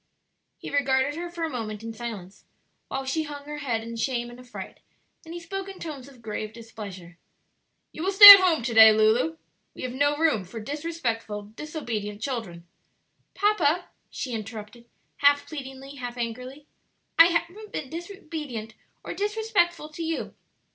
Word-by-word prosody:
He - - -8
regarded 275 0 +1
her 345 +3 -5
for 345 -1 -6
a 325 - -1
moment 220 -4 -5
in 225 0 -6
silence, 215 -5 -8 0.4
while 270 0 -4
she 290 +5 -1
hung 290 -2 -7
her 295 0 -7
head 235 -6 -2
in 230 0 -7
shame 240 0 -2
and 240 - -13
affright; 250 -1 -10 0.4
then 325 - -12
he 345 - -6
spoke 390 +3 -6
in 385 - -10
tones 285 -6 -8
of 255 -4 -17
grave 215 0 -5
displeasure, 200 -6 -10 0.7
"You - - -8
will 380 +3 0
stay 405 +1 +14
at 395 - +7
home 350 -8 +2
to 235 0 -2
day, 220 0 +9
Lulu; 215 -7 +2 0.4
we - - -8
have 250 -1 -4
no 290 +2 +1
room 305 -11 +2
for 195 +6 -9
disrespectful, 235 -6 -4
disobedient 230 -10 -5
children 220 -9 -5 0.4
" - - -46
"Papa," 355 -5 +1 0.2
she 255 - -5
interrupted, 220 +2 -8 0.3
half 285 0 +3
pleadingly, 270 -1 -9
half 245 -1 -6
angrily, 250 +5 -6 0.5
"I 330 - +10
haven't 355 +5 -3
been 270 -4 -6
disobedient 315 - -7 0.3
or - - -5
disrespectful 405 -6 0
to 310 +2 -9
you." 325 0 -3
265 Hz, 165 wpm, -26 LUFS, 225-325 Hz, 0.7 s, stay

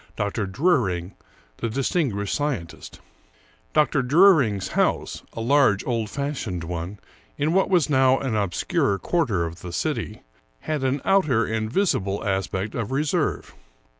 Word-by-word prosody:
Dr. 105 0 -2
Druring, 100 - 0 0.4
the 115 - -2
distinguished 120 - -1
scientist. 140 - -4 0.7
Dr. 150 -3 +2
Druring's 135 - +4
house, - - 0
a 115 - -5
large, 125 -5 +3
old 115 -4 -1
fashioned 130 - -3
one 85 +4 -5 0.4
in 150 +3 0
what 190 +1 +2
was 180 -5 +3
now 130 -2 +4
an 130 -5 -2
obscure 100 0 0
quarter 110 - 0
of 85 +1 -8
the 90 - -7
city, - - -3 0.4
had 150 -3 -2
an 135 +1 0
outer 155 - +3
and 110 0 -2
visible 100 - 0
aspect 95 +1 -2
of 115 -3 -3
reserve. 145 +2 -1
115 Hz, 135 wpm, -24 LUFS, 100-145 Hz, 0.7 s, Druring's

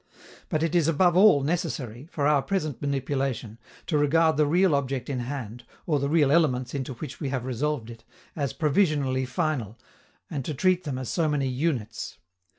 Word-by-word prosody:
But 155 0 0
it 165 - 0
is 170 -3 +3
above 175 +2 +3
all 185 -7 +6
necessary, 140 -5 -3
for 145 - -1
our 145 -1 +4
present 155 -6 -2
manipulation, 135 -5 -2 0.3
to 155 -4 +1
regard 160 +2 +3
the 150 0 +3
real 175 +2 +3
object 135 -1 -1
in 130 - -2
hand, 120 -2 -5 0.2
or 150 -4 +1
the 140 +1 -1
real 150 -3 +3
elements 130 -6 +2
into 135 -1 -3
which 140 +3 -8
we 145 - -2
have 130 -2 -3
resolved 130 -1 -2
it, 115 -1 -13 0.3
as 140 -4 -1
provisionally 145 -5 +1
final, 130 - -2 0.5
and 140 -3 -4
to 150 - -4
treat 185 +4 +2
them 140 -4 -3
as 130 -2 -5
so 165 -3 +1
many 145 -2 0
units. 130 - -2
145 Hz, 180 wpm, -26 LUFS, 130-155 Hz, 0.5 s, all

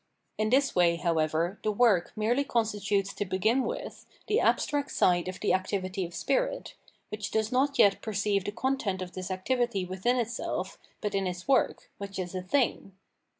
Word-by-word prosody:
In 215 0 +1
this 270 +2 +3
way, 175 -2 +4
however, 165 +2 0
the 215 - 0
work 210 -5 +3
merely 230 +6 +1
constitutes 205 -5 0
to - - -2
begin 210 +7 +1
with - - -6 0.2
the 430 - +2
abstract 290 - +1
side 175 -1 +2
of 185 0 -5
the - - +2
activity 185 0 -1
of 170 0 -9
spirit, - - -1 0.4
which 210 0 -4
does 220 +1 0
not 275 +3 +1
yet 200 -1 +5
per 220 - -4
ceive 200 -1 +1
the 205 - -2
content 225 -6 -1
of 180 - -8
this 185 0 -6
activity 200 +1 0
within 190 +7 0
itself 235 -1 -3 0.2
but 210 -1 -2
in 195 -1 0
its 180 +3 -5
work, 270 -2 +1
which 200 -1 -6
is 180 -1 -4
a 185 - -3
"thing." 195 -1 0
200 Hz, 180 wpm, -29 LUFS, 185-240 Hz, 0.4 s, yet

